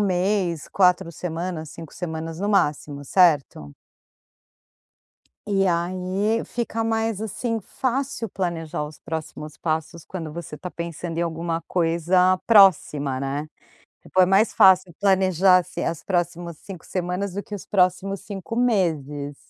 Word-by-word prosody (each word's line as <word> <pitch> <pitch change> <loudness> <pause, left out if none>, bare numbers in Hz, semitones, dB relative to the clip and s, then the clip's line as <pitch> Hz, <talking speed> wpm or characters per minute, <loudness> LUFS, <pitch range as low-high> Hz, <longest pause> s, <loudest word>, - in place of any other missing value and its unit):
mês, 180 -3 0
4 180 -3 +3
semanas, 165 -2 -4
5 165 -2 -10
semanas 160 -1 -5
no 205 - -1
máximo, 150 -6 0
certo? 145 - +2 1.7
E, 195 -2 +2
aí, 185 +5 0
fica 230 -1 -3
mais, 225 -2 -1
assim, 225 +2 -2
fácil 260 +1 -3
planejar 165 -5 -3
os 150 0 -9
próximos 155 -1 -6
passos, 160 0 -3
quando 165 -5 -6
você 165 -2 -7
tá 180 - -6
pensando 170 -1 -5
em - - +1
alguma 165 0 -2
coisa 180 +2 +2
próxima, 150 - +4
né? 140 +3 -3 0.6
Depois 185 0 +3
é 180 - -3
mais 200 +4 +4
fácil 185 -2 +5
planejar, 190 -2 +4
assim, 180 - -3
as 165 -1 -3
próximas 175 -3 -2
5 190 -5 -10
semanas 180 +1 -3
do 200 +2 -4
que - - -10
os 195 - -9
próximos 190 +1 +1
5 200 +1 -7
meses, 155 - 0
180 Hz, 130 wpm, -23 LUFS, 160-195 Hz, 1.7 s, fácil